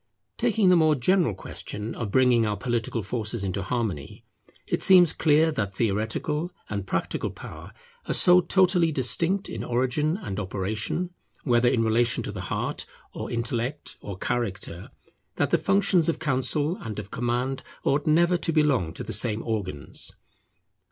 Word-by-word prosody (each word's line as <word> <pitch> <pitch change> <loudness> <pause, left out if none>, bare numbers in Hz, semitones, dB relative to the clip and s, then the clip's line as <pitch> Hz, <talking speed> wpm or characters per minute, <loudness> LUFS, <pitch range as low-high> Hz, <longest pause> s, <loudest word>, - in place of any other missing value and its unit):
Taking 205 -5 +2
the 180 - +6
more 155 -2 +4
general 155 - +2
question 105 +3 -6
of 115 -4 -4
bringing 125 0 +4
our 105 -2 -1
political 115 0 -2
forces 105 0 -3
into 95 0 -2
harmony, 100 - -3 0.4
it - - -1
seems 180 -4 +6
clear 160 +1 +3
that 100 -9 -3
theoretical 115 - -1 0.2
and 100 -2 -3
practical - - -2
power - - -10 0.4
are - - 0
so 180 0 +6
totally 180 -2 +3
distinct 170 - 0
in - - -5
origin 130 +7 0
and 105 - -5
operation, 105 - -3 0.3
whether 120 -2 +3
in 115 -2 +2
relation 115 +1 +1
to - - -4
the - - -6
heart, - - -3 0.3
or - - -5
intellect, 120 +4 -3
or 100 -2 -7
character, 100 -6 -3 0.5
that - - 0
the - - +3
functions 195 -4 +2
of 165 - 0
counsel 145 +4 0
and 110 -2 -6
of 105 -1 -7
command 125 +2 -1 0.2
ought 145 +2 +1
never 170 +3 +4
to 170 - -1
belong 140 - +2
to - - -5
the - - -5
same 105 +1 0
organs. 95 -10 -4
120 Hz, 155 wpm, -26 LUFS, 105-160 Hz, 0.5 s, the